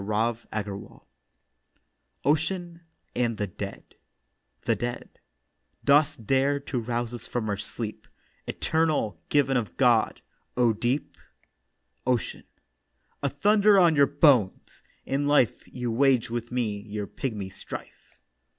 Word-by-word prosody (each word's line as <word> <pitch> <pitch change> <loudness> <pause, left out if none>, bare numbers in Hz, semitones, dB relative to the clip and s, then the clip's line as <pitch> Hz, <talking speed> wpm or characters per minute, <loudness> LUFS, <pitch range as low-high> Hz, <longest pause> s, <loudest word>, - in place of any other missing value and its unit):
OCEAN 170 +3 0 0.3
AND 120 -2 0
THE 105 - -1
DEAD 90 - -7 0.8
THE - - +2
DEAD: 120 0 -5 0.7
'Dost 145 -4 +3
dare 135 +4 +2
to 140 -2 -3
rouse 120 0 -2
us 120 -1 -7
from 120 -3 -2
our 105 - 0
sleep, 105 +2 -6 0.4
Eternal, 155 -9 0
given 135 -2 +3
of 115 -4 -4
God, 120 -4 +3 0.4
O 120 -2 +4
Deep?' 120 +6 -2 0.9
OCEAN: 125 -3 -1 0.8
'A 140 - +1
thunder 205 +7 +4
on 170 -4 +5
your 140 -1 +5
bones! 140 - +2 0.2
In 140 +2 0
life 145 -6 +2
You 125 -2 -4
waged 125 -1 +3
with 120 0 -4
me 115 -5 -1
your 105 0 -5
pigmy 105 -5 -4
strife. 100 - -10
125 Hz, 115 wpm, -27 LUFS, 115-145 Hz, 0.9 s, on